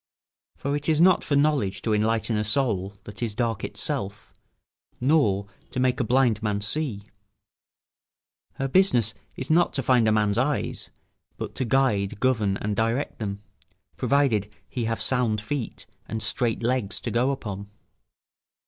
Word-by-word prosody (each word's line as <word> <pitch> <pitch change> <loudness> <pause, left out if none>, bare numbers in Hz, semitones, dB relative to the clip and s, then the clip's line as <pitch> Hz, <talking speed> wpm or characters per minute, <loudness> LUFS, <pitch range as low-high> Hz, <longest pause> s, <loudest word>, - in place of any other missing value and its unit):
For 140 +1 -2
it 145 +2 -2
is 155 -1 +3
not 180 +1 +5
for 145 - 0
knowledge 140 -9 +1
to 110 - +1
enlighten 110 +1 +1
a 105 - +1
soul 105 -4 0
that 105 +2 -9
is 115 -3 -1
dark 115 -3 -1
of - - -2
itself, 100 +1 -4 0.7
nor 125 -8 +3 0.2
to - - -4
make 130 -1 +2
a - - +2
blind 120 -2 +2
man 105 -2 0
see. 105 -1 -2 1.5
Her 135 - -2
business 125 - +3 0.2
is 130 +3 -3
not 170 +2 +4
to 135 - 0
find 120 -3 +4
a - - +4
man's 105 0 +2
eyes, 135 +2 -1 0.5
but - - -5
to 130 - -2
guide, 110 -5 +1
govern, 110 -7 +1
and 105 0 -2
direct 115 +6 -1
them, 100 -2 -4 0.5
provided 115 -8 +1 0.2
he 120 -3 -3
have 115 0 -1
sound 120 -5 +1
feet 120 +2 -4 0.2
and 110 0 -3
straight 115 +2 0
legs 120 -4 0
to - - -3
go 120 +3 +2
upon. 100 -7 -4
115 Hz, 155 wpm, -25 LUFS, 105-135 Hz, 1.5 s, not